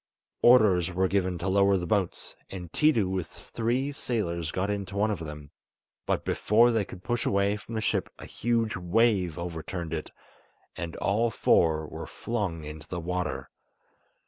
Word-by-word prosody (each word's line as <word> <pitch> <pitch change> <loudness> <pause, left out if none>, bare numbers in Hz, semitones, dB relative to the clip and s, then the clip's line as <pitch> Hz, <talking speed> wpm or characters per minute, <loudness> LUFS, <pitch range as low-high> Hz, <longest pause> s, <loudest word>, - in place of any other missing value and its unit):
Orders 100 -8 +5
were 95 +1 +1
given 95 -2 0
to 85 - -4
lower 100 0 +4
the 90 - -3
boats, 95 0 -1
and 90 -3 -7
Tiidu 145 -11 +3
with 95 -3 -2
three 125 +5 -2
sailors 85 - -2
got 95 +5 -1
into 100 -1 -4
one 105 +2 +2
of 100 - -2
them, 75 -2 -8 0.6
but - - 0
before 115 +3 +4
they 110 -3 +2
could 90 -1 -10
push 120 0 -1
away 100 +1 +2
from 105 +3 -8
the 110 - -1
ship - - 0
a - - -9
huge 115 -1 0
wave 95 -1 +2
overturned 85 0 -5
it, 80 - -4 0.7
and 85 -1 -5
all 110 +4 +1
four 80 -7 +3
were - - -7
flung 100 -9 -3
into 75 0 -8
the 90 - -4
water. 85 -7 -3
95 Hz, 165 wpm, -28 LUFS, 85-110 Hz, 0.7 s, Orders